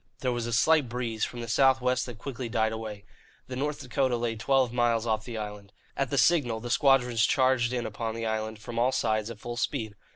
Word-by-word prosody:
There 125 - 0
was 120 -1 -2
a - - -3
slight 145 +3 +3
breeze 115 -2 -2
from 120 - -7
the 115 - -5
south 130 +3 +4
west 125 0 0
that 120 -3 -8
quickly 125 -1 -5
died 110 -1 +1
away. 110 -2 -6 0.4
The 130 - -7
North 145 +3 -2
Dakota 130 -3 0
lay 115 -1 -2
twelve 130 +1 +1
miles 120 -2 +2
off 110 -1 -1
the 120 -2 -6
island. 105 -2 -7 0.2
At 135 -2 -1
the 140 - -1
signal 125 -6 +3
the 120 +1 -6
squadrons 125 -5 +3
charged 130 -1 +3
in 120 -2 -2
upon 110 +1 -4
the 115 0 -3
island, 110 0 -2
from 115 +2 -5
all 125 +2 +3
sides, 110 -3 0
at 115 - -7
full 120 0 -6
speed. 115 -4 -2
120 Hz, 225 wpm, -28 LUFS, 110-130 Hz, 0.4 s, south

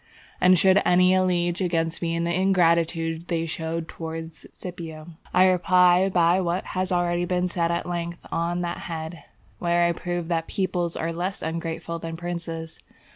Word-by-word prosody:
And 185 0 +6
should 190 +3 +5
any 180 +1 +4
allege 180 -1 +1
against 165 -2 0
me 165 -1 -1
the 170 +1 0
ingratitude 170 -3 +2
they 165 -1 -1
showed 165 0 -3
to 160 0 -6 0.2
Scipio, 165 -3 -8 0.2
I 185 - +5
reply 180 0 +4
by 175 0 +3
what 175 +1 -1
has 185 0 -1
already 175 0 +1
been 180 0 0
said 170 -1 0
at 170 0 -1
length 170 -1 -4
on 170 +1 -1
that 175 0 -3
head, 160 0 -6 0.3
where 175 0 +2
I 170 - +3
proved 175 0 -3
that 165 -1 -1
peoples 180 -3 -1
are 165 - -2
less 180 +4 -3
ungrateful 165 +1 -4
than 165 0 -6
princes. 165 -2 -5
170 Hz, 160 wpm, -25 LUFS, 165-180 Hz, 0.3 s, And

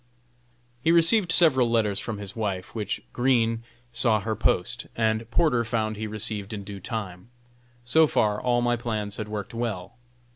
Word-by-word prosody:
He 165 - +4
received 170 +3 +4
several 140 -8 +5
letters 105 -4 +1
from 110 -2 -4
his 100 -1 -8
wife, 100 -5 -3
which 105 -3 -3
Green 115 -3 +2 0.3
saw 115 -3 +2
her 110 +2 -2
post, 105 +2 0
and 110 0 0
Porter 125 -3 +2
found 110 -1 -1
he 110 +1 -4
received 105 -1 -3
in 100 -2 -5
due 100 0 -8
time. 95 -2 -6 0.6
So 160 +6 +5
far 105 -6 +1
all 120 -1 +1
my 120 0 +2
plans 110 -4 -3
had 110 - -4
worked 105 -1 -5
well. 115 -6 -3
110 Hz, 160 wpm, -26 LUFS, 105-120 Hz, 0.6 s, several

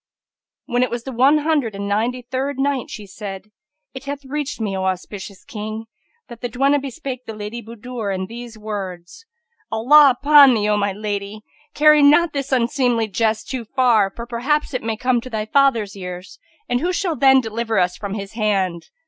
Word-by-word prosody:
When 245 +1 0
it 255 - +2
was 240 +1 -4
the 265 - -6
One 265 +5 +4
Hundred 295 -8 0
and 200 0 -4
Ninety 235 +5 -1
third 265 +3 -3
Night, 270 -2 -1
She 210 - -8
said, 195 +1 -8 0.4
It 265 +1 -9
hath 280 0 -6
reached 290 0 -4
me, 205 -3 -2
O 190 0 -2
auspicious 190 +1 -5
King, 215 +1 -6 0.4
that 235 -2 -12
the 245 - -3
duenna 275 +5 +2
bespake 270 -2 -6
the 220 - -6
Lady 215 +3 -6
Budur 230 -1 -6
in 190 -1 -2
these 235 +2 -9
words, 205 - -7 0.4
"Allah 260 +4 +6
upon 285 -3 +7
thee, 210 -1 0
O 210 - +2
my 200 -1 0
lady! 205 +1 -5 0.3
carry 300 0 +6
not 295 +3 +5
this 275 -1 -3
unseemly 245 -2 +1
jest 220 +1 0
too 255 -3 -4
far; 230 -4 +2
for 235 - -6
perhaps 265 +6 -1
it 255 - -2
may 225 0 -3
come 250 0 +1
to 255 - -9
thy 215 -3 -3
father's 230 -5 +2
ears, 180 - -8 0.3
and 245 - 0
who 350 +6 0
shall 360 -2 -1
then 265 -1 +5
deliver 225 -2 -2
us 180 -1 +2
from 200 +1 -5
his 200 -1 -6
hand?" 195 -6 -1
235 Hz, 190 wpm, -20 LUFS, 210-270 Hz, 0.4 s, upon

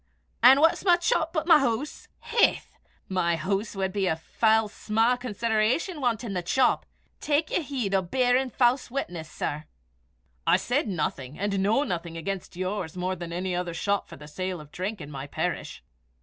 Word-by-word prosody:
"An' 260 +4 +8
what's 325 +1 +4
my 360 -3 +6
chop 335 -2 0
but 315 -2 -1
my 325 -3 +7
hoose? 270 +2 -2
Haith! - - +1 0.3
my 175 -3 +1
hoose 195 +6 -2
wad 190 -1 -2
be 195 -3 +1
o' 160 - +1
fell 220 +6 +2
sma' 225 +3 +1
consideration 235 - 0
wantin' 235 -4 -1
the 180 - -1
chop. 250 +9 +2 0.3
Tak 305 +1 0
ye - - +1
heed 260 -10 -3
o' 195 - +3
beirin' 250 +7 +1
fause 250 +1 +2
witness, 175 - -4
sir." 150 0 -4 0.8
"I - - +6
said 250 +1 0
nothing, 150 -7 -3
and 200 0 -1
know 210 +8 +2
nothing, 170 - -4
against 190 +3 -5
yours 185 -2 -3
more 185 +1 -1
than 170 -1 -7
any 180 +1 -2
other 175 -1 -3
shop 200 +4 -1
for - - -11
the 150 +1 -12
sale 185 +3 -4
of 150 -1 -13
drink 195 +2 -4
in 145 0 -8
my 135 0 -6
parish." - - -4
200 Hz, 180 wpm, -26 LUFS, 175-250 Hz, 0.8 s, An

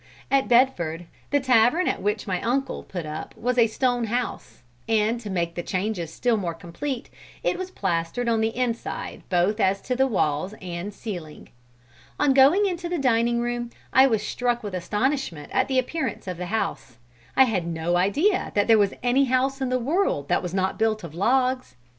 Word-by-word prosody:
At 275 -1 +3
Bedford, 175 -10 +2 0.2
the 285 - +3
tavern 255 +6 +3
at - - -1
which 210 +1 -1
my 185 -3 -2
uncle 265 +3 -1
put 175 -4 -6
up 155 +1 -7
was 250 +2 0
a 230 - +6
stone 245 +1 0
house, 240 - -4 0.3
and 225 +1 +2
to 210 - -7
make 170 -3 -1
the 175 - -3
changes 185 -2 -2
still 240 +5 +1
more 175 -5 -3
complete, 235 - -5 0.3
it - - +1
was 370 0 -5
plastered 190 - -2
on 225 -1 +2
the 225 +1 -1
inside 240 -2 -3
both 185 +4 +2
as 195 -1 +2
to 250 - -2
the 265 +1 +3
walls 185 - 0
and 180 +2 -5
ceiling. 180 -7 -8 0.7
On 290 -2 +4
going 280 +10 +6
into 350 -2 -2
the 350 - -1
dining 235 -3 +2
room, 240 0 -2 0.2
I 265 +1 +7
was 220 -4 0
struck 240 0 -1
with 205 -2 -5
astonishment 205 - -2
at - - +2
the 265 -1 0
appearance 260 -1 -2
of 180 -2 -4
the 180 0 -4
house. 175 - -3 0.4
I 265 - +9
had 195 -9 0
no 165 +1 -1
idea 290 - +2
that 205 -1 +3
there 225 -2 +6
was 200 -1 +2
any 255 +3 +3
house 265 +2 0
in 260 - 0
the 255 - +1
world 255 - 0
that - - +2
was 180 - -4
not 190 +2 0
built 220 -2 +1
of 165 -3 -8
logs. 255 +7 +1
225 Hz, 190 wpm, -25 LUFS, 185-255 Hz, 0.7 s, I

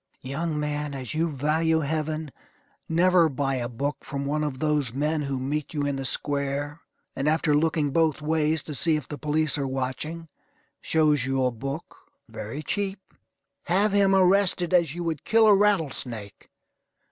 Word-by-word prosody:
Young 150 +4 -2
man, 150 -1 -2
as 130 -3 -5
you 165 +2 +1
value 160 +3 +1
Heaven, 155 0 -2 0.6
never 170 0 +4
buy 135 -1 -1
a 120 -1 -3
book 140 +4 -3
from 140 -1 -4
one 150 +2 0
of 145 -3 -3
those 150 -4 0
men 150 +3 0
who 140 -2 -2
meet 145 +4 -3
you 145 -1 0
in 140 -1 -1
the 135 0 -4
square, 145 +3 -2 0.3
and, 135 +2 -1
after 155 -1 +2
looking 150 -1 +1
both 160 0 +2
ways, 155 0 +1
to 150 - -7
see 160 +3 +2
if 150 -4 -4
the 145 - -7
police 150 +1 +1
are 140 - -1
watching, 135 +6 -4 0.5
shows 150 -5 +2
you 135 0 +1
a 125 - +2
book 135 +7 -6 0.3
very 140 +9 -6
cheap. 195 +3 -3 0.5
Have 195 +4 +2
him 195 -1 +4
arrested 185 -1 +3
as 170 -4 +3
you 175 - -4
would 160 -4 -3
kill 225 0 +4
a 215 - +7
rattle 195 -7 +3
snake. 110 -5 -7
150 Hz, 170 wpm, -26 LUFS, 140-165 Hz, 0.6 s, a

